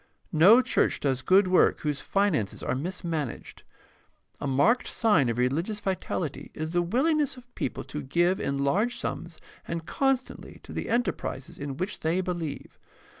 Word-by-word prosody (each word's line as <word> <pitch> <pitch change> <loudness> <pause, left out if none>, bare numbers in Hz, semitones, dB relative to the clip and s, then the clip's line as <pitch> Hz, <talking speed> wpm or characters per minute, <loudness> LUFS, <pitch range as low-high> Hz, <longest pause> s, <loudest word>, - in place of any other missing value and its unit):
No 205 +11 +7
church - - +1
does 135 -3 0
good 185 +7 +4
work 185 0 +3
whose 150 -2 -2
finances 190 - 0
are - - -1
mismanaged. 160 -1 -4 0.8
A - - -3
marked 140 - +3
sign 210 - +3
of 115 - -2
religious 160 - 0
vitality 185 -6 -3
is 155 +1 -4
the 175 0 +2
willingness 275 - +1
of 245 0 -16
people - - -3
to 150 - -6
give 175 +7 +1
in 140 - -1
large 205 +13 +1
sums - - -5 0.3
and 165 -1 -4
constantly 270 +3 -1
to - - -10
the - - -4
enterprises 230 - -2
in 140 -1 -5
which 185 +5 -3
they 165 +3 0
believe. 175 -5 -4
175 Hz, 155 wpm, -27 LUFS, 145-210 Hz, 0.8 s, No